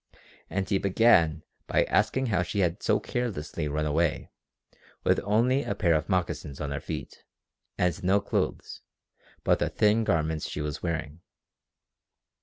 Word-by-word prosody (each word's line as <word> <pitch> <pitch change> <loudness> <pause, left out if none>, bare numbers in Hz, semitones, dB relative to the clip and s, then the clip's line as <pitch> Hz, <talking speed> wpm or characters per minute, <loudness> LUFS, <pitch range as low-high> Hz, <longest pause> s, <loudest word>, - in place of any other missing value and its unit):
And 95 -1 -2
he 95 0 +1
began 95 -6 +3 0.2
by - - +3
asking 130 0 +1
how 105 -7 +1
she 100 +3 -1
had 85 -2 0
so - - +2
carelessly 90 -10 -3
run 75 +1 -1
away 75 +1 0 0.7
with - - +3
only 120 +6 +2
a 100 - -3
pair 85 -4 +2
of 80 +4 0
moccasins 85 -6 -2
on 75 -2 -3
her 70 - -2
feet - - -7 0.5
and 90 -2 0
no 95 +3 +4
clothes 100 - -3 0.6
but - - +3
the - - 0
thin 105 +2 +3
garments 80 -5 0
she - - -5
was 75 0 -4
wearing. 80 -2 -4
85 Hz, 150 wpm, -27 LUFS, 75-100 Hz, 0.7 s, no